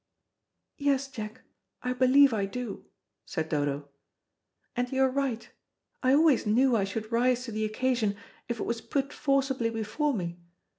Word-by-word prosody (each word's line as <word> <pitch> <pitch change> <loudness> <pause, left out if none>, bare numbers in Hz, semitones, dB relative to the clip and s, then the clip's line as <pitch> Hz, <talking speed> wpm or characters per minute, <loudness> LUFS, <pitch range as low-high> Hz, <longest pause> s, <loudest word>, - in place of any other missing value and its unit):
"Yes, 280 -1 +1
Jack, 220 -5 -7 0.4
I 250 0 0
believe 260 +1 +5
I 200 -3 0
do," 240 0 -6 0.4
said 160 -3 -3
Dodo. 145 -1 -1 0.9
"And 245 0 -1
you 265 0 +2
are 265 - +3
right; 265 -4 -1 0.5
I 260 +1 +4
always 300 -6 +4
knew 245 +4 +4
I 200 -3 +2
should 215 +3 -5
rise 245 +1 +2
to 245 - -6
the 215 0 -1
occasion 220 -1 0 0.3
if 235 -1 -2
it - - -1
was 230 -1 -2
put 275 +3 -2
forcibly 270 -4 +1
before 230 +6 -1
me. 175 -3 -4
245 Hz, 155 wpm, -28 LUFS, 215-265 Hz, 0.9 s, believe